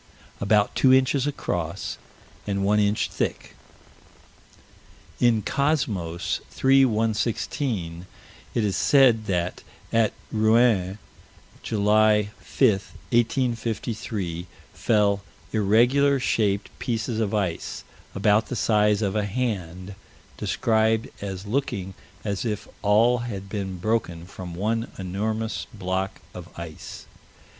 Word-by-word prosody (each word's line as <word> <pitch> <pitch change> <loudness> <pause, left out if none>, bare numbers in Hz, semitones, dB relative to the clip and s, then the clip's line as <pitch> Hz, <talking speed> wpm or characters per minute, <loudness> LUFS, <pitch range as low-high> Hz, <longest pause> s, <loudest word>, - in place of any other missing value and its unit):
About 105 +1 +2
two 130 - +4
inches 130 +1 +3
across, 90 - -3 0.5
and 100 -1 0
one 105 +1 +3
inch 105 0 +2
thick. - - -4 1.6
In 115 -3 +3
Cosmos, 105 - -1
3 135 0 +4
116, 110 - -1 0.5
it 115 - +2
is 100 -3 0
said 120 -2 +4
that, 90 -1 -1 0.3
at 115 -2 +3 0.2
Rouen, 110 -3 +3 0.6
July 105 0 +3
5, 130 - +2 0.4
1853, 115 -6 -1 0.3
fell 100 -3 +2 0.3
irregular 120 +7 +4
shaped 105 -5 0
pieces 115 -1 -2
of 110 -1 0
ice, 95 -5 -2 0.3
about 105 +2 +3
the - - -4
size 105 -2 +2
of 100 0 -1
a 105 -1 +1
hand, 100 -5 -3 0.4
described 110 +1 +1
as 95 -1 -5
looking 100 -5 -2 0.3
as 100 -2 -2
if 105 -4 -3
all 115 +4 +4
had 100 -5 -5
been 95 -3 -4
broken 90 -4 -1
from 90 -1 -8
one 115 +5 -1
enormous 110 +4 -3
block 95 -1 -3
of - - -9
ice. 85 -2 -8
105 Hz, 105 wpm, -25 LUFS, 95-115 Hz, 1.6 s, two